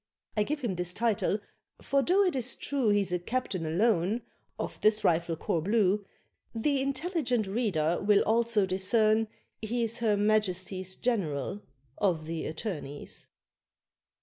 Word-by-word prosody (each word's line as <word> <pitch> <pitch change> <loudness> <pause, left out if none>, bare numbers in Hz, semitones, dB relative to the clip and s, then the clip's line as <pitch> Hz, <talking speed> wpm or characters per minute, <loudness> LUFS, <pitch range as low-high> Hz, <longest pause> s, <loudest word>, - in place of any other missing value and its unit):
(I 210 - +2
give 290 +8 -1
him 210 -8 -2
this 180 0 -1
title, 220 -2 +1 0.4
for 275 - +1
though 370 +7 +3
it 360 -6 +1
is 255 -1 +1
true 270 -6 -1
He's 205 -3 +2
a 180 - +1
captain 185 -4 -2
alone 200 +4 +1 0.3
of - - -5
this 215 0 +3
rifle 165 0 +2
corps 160 +1 -1
blue 205 +1 +2 0.5
The 275 +4 +1
intelligent 275 - 0
reader 190 -6 0
will 205 0 +4
also 230 -2 +2
discern 215 +4 +2 0.3
he's 230 +1 -1
Her 215 -3 +2
Majesty's 190 -3 0
General 195 - -1 0.4
of 170 -6 +1
the 165 0 -4
Attorneys.) 155 -5 -6
210 Hz, 135 wpm, -29 LUFS, 180-235 Hz, 0.5 s, will